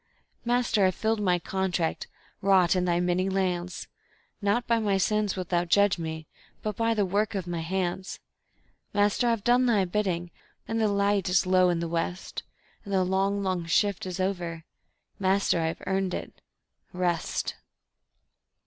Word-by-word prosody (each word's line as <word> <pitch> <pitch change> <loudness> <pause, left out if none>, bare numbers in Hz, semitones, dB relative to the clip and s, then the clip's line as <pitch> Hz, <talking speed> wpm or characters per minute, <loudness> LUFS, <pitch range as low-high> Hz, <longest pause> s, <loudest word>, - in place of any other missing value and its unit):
Master, 240 -5 +2
I've 185 - -1
filled 220 -1 0
my 180 -3 +3
contract, 180 -1 -2 0.3
wrought 190 -2 +4
in 180 -1 +1
Thy 175 -1 +1
many 180 +2 +1
lands; 180 -2 -2 0.5
Not 210 +4 +1
by 230 -1 +2
my 205 -3 +1
sins 210 +1 +1
wilt 185 -1 -5
Thou 175 -1 +2
judge 200 +2 +3
me, 160 -1 -5 0.4
but 215 -2 -2
by 230 +1 +1
the 205 -2 +2
work 205 +3 0
of 190 -3 -2
my 175 -1 -3
hands. 185 +2 -3 0.8
Master, 205 +4 +2
I've 230 -3 +1
done 245 +1 +4
Thy 210 -5 +3
bidding, 175 -3 -1 0.4
and 225 0 -1
the 220 - +3
light 200 -1 +1
is 180 0 +3
low 185 0 +4
in 170 -1 0
the 170 - -2
west, 170 +2 -3 0.4
And 200 - -8
the 190 -1 +3
long, 195 +2 0
long 185 -3 -1
shift 200 +2 +1
is 180 0 -5
over... 175 -4 -2 0.6
Master, 190 -2 +2
I've 160 0 -3
earned 190 -1 0
it - - -8 0.5
Rest. 175 -2 -1
190 Hz, 160 wpm, -27 LUFS, 175-205 Hz, 0.8 s, wrought